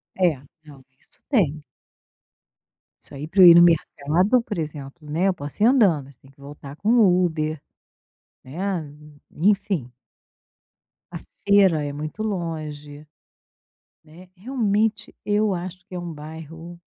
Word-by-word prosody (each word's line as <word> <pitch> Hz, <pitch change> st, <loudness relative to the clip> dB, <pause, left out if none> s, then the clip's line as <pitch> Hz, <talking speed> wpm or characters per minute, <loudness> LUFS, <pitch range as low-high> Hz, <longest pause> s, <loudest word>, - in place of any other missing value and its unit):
É. 180 Hz, -5 st, +2 dB, 0.3 s
Não, 140 Hz, -3 st, -15 dB, 0.2 s
isso -, -, -16 dB
tem. 155 Hz, -, +1 dB, 1.4 s
Isso -, -, -7 dB
aí 145 Hz, +2 st, -7 dB
pra 190 Hz, +3 st, +2 dB
eu -, -, +11 dB
ir 170 Hz, -, +10 dB
no 170 Hz, -, +8 dB
mercado, 175 Hz, -, +2 dB
por 210 Hz, -5 st, -6 dB
exemplo, 150 Hz, 0 st, -7 dB
né, 170 Hz, +6 st, 0 dB
eu 190 Hz, -, +2 dB
posso 145 Hz, +2 st, -9 dB
ir 215 Hz, -, +6 dB
andando. 185 Hz, -, +3 dB
Tem 135 Hz, -, -20 dB
que 135 Hz, -, -30 dB
voltar 140 Hz, 0 st, -11 dB
com 210 Hz, -, -2 dB
o 190 Hz, -7 st, +4 dB
Uber, 155 Hz, -2 st, -3 dB, 0.8 s
né. 170 Hz, +2 st, -4 dB, 0.4 s
E 180 Hz, +7 st, +2 dB
enfim. 190 Hz, -, -1 dB, 1.2 s
A -, -, -5 dB, 0.3 s
feira 195 Hz, -6 st, +4 dB
é 145 Hz, -, -5 dB
muito 155 Hz, +8 st, -6 dB
longe, 155 Hz, -6 st, -5 dB, 1.0 s
né. 170 Hz, +4 st, -16 dB
Realmente, 220 Hz, -1 st, -1 dB
eu 210 Hz, -1 st, +1 dB
acho 180 Hz, +1 st, -7 dB
que 185 Hz, -, -12 dB
é -, -, -3 dB
um 175 Hz, -1 st, -6 dB
bairro 160 Hz, +3 st, -10 dB
170 Hz, 140 wpm, -23 LUFS, 150-195 Hz, 1.4 s, eu